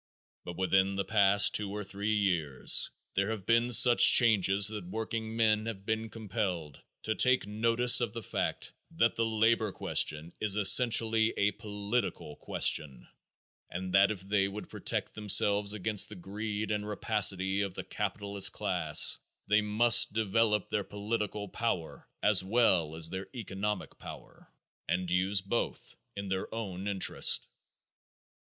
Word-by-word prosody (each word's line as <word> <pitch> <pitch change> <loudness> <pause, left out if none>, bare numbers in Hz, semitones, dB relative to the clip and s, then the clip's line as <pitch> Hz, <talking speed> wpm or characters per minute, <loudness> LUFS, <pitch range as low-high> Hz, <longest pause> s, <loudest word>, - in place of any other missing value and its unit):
But 85 -1 -8
within 95 +1 +1
the 100 - -3
past 100 -2 +3
two 105 -1 -1
or 105 +1 -6
three 100 +2 -3
years 85 -10 +1 0.2
there 100 +2 -1
have 110 -4 -6
been 115 +1 +1
such 120 +1 +7
changes 100 -4 +4
that 105 -5 -7
workingmen 110 +1 -2
have 100 -4 -7
been 110 0 -3
compelled 95 -9 -5 0.2
to 110 - -1
take 125 +1 +1
notice 115 +4 +2
of 120 -4 -2
the 115 0 -8
fact - - -4 0.2
that - - 0
the 115 0 -1
labor 110 -1 +1
question 80 -2 -2
is 105 -2 +2
essentially 110 +1 +3
a 100 +1 +1
political 105 -6 -5
question, 65 -5 -1 0.6
and 90 +1 -6
that 100 +1 +4
if 105 -4 -5
they 100 0 0
would 105 +2 -9
protect - - -3
themselves 105 -1 +3
against 105 0 0
the 105 - -10
greed 105 +3 -6
and 105 0 -3
rapacity 100 -2 +1
of 100 -2 -5
the - - -6
capitalist 100 -1 -1
class - - +2 0.3
they 105 +1 +2
must 115 +2 +4
develop 110 0 0
their 105 - -1
political 105 0 -5
power 95 -5 -5
as - - +3
well 95 -7 +1
as 80 0 0
their 95 +1 -6
economic 105 -2 -5
power, - - -13 0.4
and 90 0 -2
use 95 +2 +1
both 100 +5 -5 0.2
in 100 0 -6
their 95 0 -4
own 100 -4 -6
interest. 100 -2 +2
105 Hz, 145 wpm, -29 LUFS, 95-110 Hz, 0.6 s, such